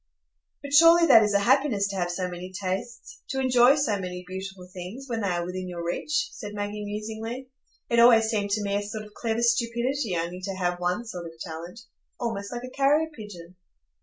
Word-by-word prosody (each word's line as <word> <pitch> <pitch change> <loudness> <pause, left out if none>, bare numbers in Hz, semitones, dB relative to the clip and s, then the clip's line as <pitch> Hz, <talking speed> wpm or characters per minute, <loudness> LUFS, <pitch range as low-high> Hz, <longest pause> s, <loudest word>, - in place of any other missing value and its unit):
"But 280 0 -6
surely 335 +3 +8
that 225 -8 +8
is 210 -1 +1
a 200 - +4
happiness 250 -4 +3
to 200 - -5
have 175 -2 -1
so 180 +1 -2
many 180 +1 -7
tastes,—to 235 - -5
enjoy 255 0 +5
so 260 -9 0
many 180 -1 -5
beautiful 190 0 -7
things, 190 +9 -7
when 230 -3 -2
they 200 - 0
are 175 -2 -1
within 185 +1 -5
your 170 -1 -5
reach," 300 - -1
said 210 - -8
Maggie, 205 +1 -4
musingly. 220 +5 -5 0.4
"It 235 - +2
always 235 -1 +7
seemed 210 -2 -1
to 205 +1 0
me 200 0 0
a - - -1
sort 215 +1 -6
of 210 - -15
clever 230 +1 -2
stupidity 235 -2 +1
only 175 +2 -3
to 195 0 -4
have 175 -1 -1
one 180 +6 -1
sort 180 -6 -6
of 165 0 -13
talent,—almost 200 +5 -7
like 240 0 -5
a 255 - -7
carrier 295 +4 +3
pigeon." 185 -5 -10
210 Hz, 195 wpm, -26 LUFS, 185-240 Hz, 0.4 s, surely